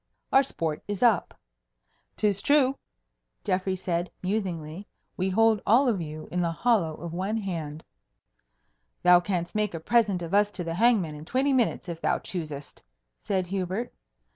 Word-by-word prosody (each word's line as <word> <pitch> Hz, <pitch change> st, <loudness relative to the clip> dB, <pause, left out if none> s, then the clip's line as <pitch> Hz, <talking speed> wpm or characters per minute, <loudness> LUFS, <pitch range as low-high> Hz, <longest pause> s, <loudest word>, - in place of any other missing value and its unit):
Our 270 Hz, -, +8 dB
sport 165 Hz, -, -3 dB
is 205 Hz, +2 st, -2 dB
up." 225 Hz, -7 st, +2 dB, 0.8 s
"'Tis 200 Hz, -2 st, +1 dB
true," 275 Hz, -2 st, +3 dB, 0.7 s
Geoffrey 190 Hz, 0 st, 0 dB
said, 180 Hz, -1 st, -2 dB
musingly, 185 Hz, -3 st, -3 dB, 0.3 s
"we 185 Hz, +1 st, -1 dB
hold 225 Hz, +2 st, +3 dB
all 250 Hz, +6 st, +4 dB
of 210 Hz, -7 st, +1 dB
you 155 Hz, -1 st, -7 dB
in 180 Hz, -, 0 dB
the 170 Hz, -1 st, 0 dB
hollow 170 Hz, -5 st, +1 dB
of 170 Hz, 0 st, -7 dB
one 195 Hz, +5 st, -1 dB
hand." 165 Hz, -7 st, -4 dB, 1.2 s
"Thou 180 Hz, 0 st, +7 dB
canst 175 Hz, -1 st, -2 dB
make 210 Hz, -4 st, -1 dB
a -, -, -4 dB
present 205 Hz, -1 st, +2 dB
of 170 Hz, +2 st, -6 dB
us 205 Hz, 0 st, +4 dB
to 180 Hz, -, -3 dB
the 165 Hz, -1 st, -3 dB
hangman 200 Hz, -5 st, +3 dB
in 150 Hz, 0 st, -9 dB
twenty 270 Hz, -, +1 dB
minutes 240 Hz, -7 st, +1 dB
if 170 Hz, -1 st, -6 dB
thou -, -, +2 dB
choosest," 150 Hz, -6 st, -6 dB, 0.4 s
said 190 Hz, -2 st, -1 dB
Hubert. 190 Hz, +4 st, -3 dB
185 Hz, 160 wpm, -27 LUFS, 170-215 Hz, 1.2 s, Our